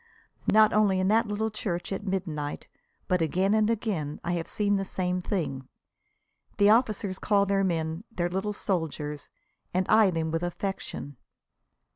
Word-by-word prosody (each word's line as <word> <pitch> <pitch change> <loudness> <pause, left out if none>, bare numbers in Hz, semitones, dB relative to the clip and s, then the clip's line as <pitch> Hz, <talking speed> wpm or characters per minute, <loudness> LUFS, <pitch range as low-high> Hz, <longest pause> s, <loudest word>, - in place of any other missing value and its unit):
Not 215 0 +6
only 205 -3 +3
in 185 +1 +2
that 225 +2 +3
little 215 +2 -1
church 185 -4 -3
at 195 +1 -3
midnight, 160 -6 -3 0.4
but 180 -3 +1
again 185 +5 +2
and 215 0 +3
again 200 -10 -2
I 170 - -1
have 170 -2 -2
seen 205 -1 +1
the 195 - -1
same 180 -1 -2
thing. 140 -9 -3 0.9
The 205 +1 +6
officers 215 -5 +1
call 200 -1 +3
their 195 0 +1
men 165 -1 -1
their 175 -5 -1
"little 190 +4 -2
soldiers," 160 -7 -3 0.5
and 185 0 +2
eye 215 -2 +6
them 165 -2 -1
with 165 0 -1
affection. 175 -6 -4
190 Hz, 155 wpm, -27 LUFS, 165-210 Hz, 0.9 s, Not